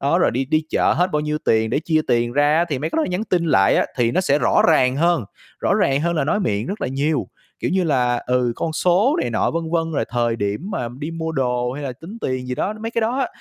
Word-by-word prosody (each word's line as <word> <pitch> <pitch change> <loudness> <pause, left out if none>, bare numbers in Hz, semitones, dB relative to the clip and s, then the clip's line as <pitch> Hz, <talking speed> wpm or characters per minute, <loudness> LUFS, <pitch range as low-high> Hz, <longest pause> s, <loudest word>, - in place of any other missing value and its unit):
đó, 145 +5 +2
rồi - - +3
đi 130 +3 -1
đi 155 +3 0
chợ - - +2
hết 180 +2 +1
bao 150 - +1
nhiêu 150 0 -2
tiền 110 0 +2
để 145 - 0
chia 160 -2 +1
tiền 120 0 +1
ra 145 +3 +3
á, 170 - +3
thì 140 -5 -2
mấy 155 +3 -3
cái - - -4
đó 320 - +3
là - - -2
nhắn 180 +5 -2
tin 175 -4 0
lại 95 -10 +4
á, - - +2
thì 120 -2 +2
nó 185 - +1
sẽ 145 -5 +2
rõ - - +3
ràng 130 -5 +3
hơn, 170 -6 +2 0.4
rõ - - +2
ràng 135 +1 +2
hơn 170 +1 0
là 145 - +1
nói 205 +8 0
miệng 105 - -1
rất 205 +2 -5
là - - -1
nhiều. 145 +3 -1 0.3
Kiểu - - -1
như 185 -1 +1
là, 125 -5 +1
ừ, 125 -1 +1
con 160 - -2
số 190 - +2
này - - -2
nọ, - - +1
vân 165 -1 -3
vân, 165 -1 0
rồi - - 0
thời 120 -2 0
điểm 100 +2 -2
mà 120 -10 -3
đi 155 +3 -4
mua 160 -1 -4
đồ 125 -3 -1
hay 145 +3 -6
là 130 - -3
tính 165 - -11
tiền 130 -1 -3
gì 125 - -2
đó, 205 +10 -2
mấy 225 - -4
cái 230 - -1
đó 230 +3 0
á, 270 - +1
150 Hz, 290 wpm, -21 LUFS, 125-170 Hz, 0.4 s, lại